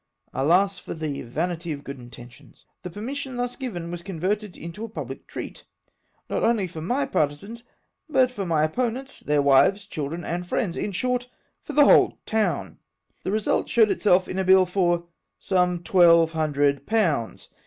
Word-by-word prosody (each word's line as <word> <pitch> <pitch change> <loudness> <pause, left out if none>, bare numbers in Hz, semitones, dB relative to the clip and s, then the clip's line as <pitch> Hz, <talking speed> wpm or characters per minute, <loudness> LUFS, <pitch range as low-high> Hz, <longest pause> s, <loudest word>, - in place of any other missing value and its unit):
Alas! 180 +8 +2
for - - -7
the 155 -3 -4
vanity 165 +7 -3
of 145 -1 -5
good 140 -2 -8
intentions. 120 +2 -14 0.2
The 180 - -6
per 205 +5 -9
mission 265 +2 -4
thus 245 0 -2
given 180 -11 -5
was 175 -1 -5
converted 195 +2 -3
into 170 +6 -8
a 230 - -5
public - - -7
treat; - - -8 0.6
not - - -2
only 225 -4 +2
for 165 -3 -8
my 250 - 0
partisans, 200 - -2 0.5
but 260 -4 +3
for 205 -6 -4
my 165 -4 +1
opponents, 250 - -2
their 145 -1 +1
wives, 140 +9 +4
children, 165 -2 -5
and 175 +1 -3
friends; 185 -3 -1
in 205 - -3
short, 250 +6 -1 0.3
for 300 - -8
the 290 0 +6
whole - - +5
town! 175 - -1 0.4
The 190 - -2
result 215 0 0
showed 220 -3 +4
itself 185 -3 +3
in 185 - -3
a - - +1
bill 190 0 +6
for 175 -2 0 0.3
some 180 -2 0
twelve 170 -2 +5
hundred 145 -3 0
pounds! 170 - 0
180 Hz, 170 wpm, -24 LUFS, 155-215 Hz, 0.6 s, the